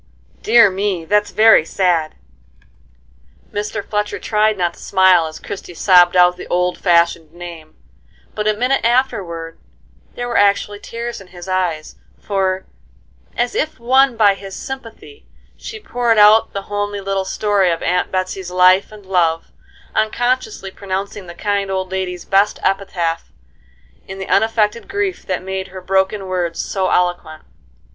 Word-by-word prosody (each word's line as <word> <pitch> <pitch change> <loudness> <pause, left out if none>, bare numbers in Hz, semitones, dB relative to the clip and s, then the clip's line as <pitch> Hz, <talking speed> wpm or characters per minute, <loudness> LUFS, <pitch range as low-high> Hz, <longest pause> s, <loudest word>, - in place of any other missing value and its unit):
"Dear 230 -2 +5
me! 190 -3 -2
that's 210 +4 +1
very 220 -5 +5
sad." 165 -2 0 1.4
Mr. 205 0 -4
Fletcher 210 0 -2
tried 215 -1 +1
not 175 -2 0
to - - -18
smile 190 -4 +3
as 155 - -9
Christie 180 -3 -8
sobbed 180 0 +5
out 180 0 +5
the - - -9
old 180 0 0
fashioned 170 -3 +2
name, 170 -3 -10 0.6
but 210 0 -2
a 215 - +2
minute 250 +5 0
afterward 200 -10 -1 0.6
there 245 - -4
were 240 - -1
actually 205 0 +2
tears 235 0 -6
in 195 - -14
his 175 0 -11
eyes, 180 -4 -2 0.2
for, 190 -2 -1 0.7
as 240 0 0
if 310 -3 -2
won 260 +1 +3
by 205 -3 +5
his 195 0 -9
sympathy, 265 - -9 0.3
she 440 0 -9
poured 240 - 0
out 210 +1 +6
the 200 - -5
homely 205 0 -3
little 195 0 -2
story 200 -1 +1
of 165 -1 -2
Aunt 180 +1 0
Betsey's 185 0 -3
life 185 +2 +4
and 210 -2 -13
love, 170 -3 0 0.4
unconsciously 220 -2 -1
pronouncing 195 0 -5
the 170 - -10
kind 200 0 -1
old 190 -1 -3
lady's 185 -2 -4
best 200 +1 +2
epitaph 180 -4 -1 0.8
in 190 - -7
the 190 - -6
unaffected 220 0 +1
grief 400 -2 -3
that 185 -1 -2
made 190 0 -4
her 190 0 -9
broken 190 +2 0
words 180 -3 -2
so 190 -2 -1
eloquent. 175 -3 -1
195 Hz, 150 wpm, -18 LUFS, 180-215 Hz, 1.4 s, out